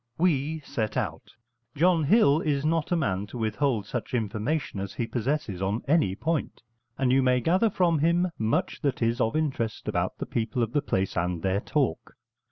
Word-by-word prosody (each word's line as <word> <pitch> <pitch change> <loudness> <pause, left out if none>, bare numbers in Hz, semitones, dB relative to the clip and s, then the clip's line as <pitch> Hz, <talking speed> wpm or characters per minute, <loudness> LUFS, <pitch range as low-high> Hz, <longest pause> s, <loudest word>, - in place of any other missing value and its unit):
We 155 -2 +1
set 110 -6 -3
out; - - -3 0.4
John 165 0 +3
Hill 155 -5 +5
is 145 -2 0
not 165 +1 0
a - - +4
man 100 - -1
to 120 - -8
withhold 110 0 0
such 120 +3 -4
information 110 +3 -2
as 100 0 -5
he 120 - -1
possesses 115 -3 -2
on 100 +4 -1
any 140 - +3
point, 160 +2 -2 0.3
and 130 -2 +2
you 135 +1 +4
may 125 -1 +3
gather 185 - +2
from 175 -5 +2
him 170 +3 +2
much 110 +1 0
that 135 -4 0
is 115 +2 +1
of 110 +2 +1
interest 135 -8 -2
about - - -1
the - - -4
people 115 +1 -1
of 115 +1 -3
the 145 - +2
place 95 -9 -1
and 90 -2 -1
their 95 +1 +1
talk. 135 - -1
130 Hz, 185 wpm, -27 LUFS, 110-155 Hz, 0.4 s, Hill